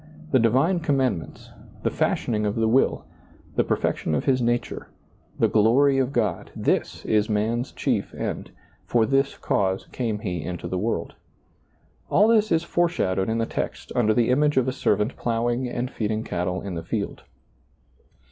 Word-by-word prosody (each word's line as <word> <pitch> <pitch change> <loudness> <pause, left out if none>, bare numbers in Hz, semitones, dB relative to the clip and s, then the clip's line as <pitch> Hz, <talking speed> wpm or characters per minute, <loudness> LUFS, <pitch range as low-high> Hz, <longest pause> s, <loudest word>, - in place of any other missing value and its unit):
The 130 - +5
divine 135 - +3
com 145 -4 +1
mandments, 125 -11 -2 0.3
the - - +1
fashioning 105 -2 0
of 105 - -1
the 115 -1 +1
will, 125 +4 +2 0.5
the - - +3
perfec - - 0
tion 80 - -1
of 70 - -1
his 130 -2 +2
nature, 120 0 -1 0.5
the - - +3
glory 135 +6 +4
of 130 0 0
God 105 -10 -1
— - - -26
this - - -1
is 105 0 +2
man's 110 +4 0
chief - - -1
end; - - -4 0.4
for 115 -2 +3
this 135 +2 +1
cause 95 -1 0
came 115 -4 -2
he 90 -5 -3
into 90 +3 -5
the 90 - -2
world. 115 +4 -2 1.0
All 205 +4 +5
this 215 -2 +3
is 165 0 +3
foreshadowed 160 - 0
in 110 - 0
the 115 - +1
text - - -4
under 110 -3 +3
the 120 0 +3
image 150 +2 +2
of 130 -1 +3
a - - +1
servant 105 -2 0
plowing 120 +2 -1
and 120 +1 -3
feeding 110 0 -2
cattle 90 0 -2
in 100 - -5
the 85 - -4
field. 100 +5 -4
115 Hz, 175 wpm, -24 LUFS, 105-135 Hz, 1.0 s, The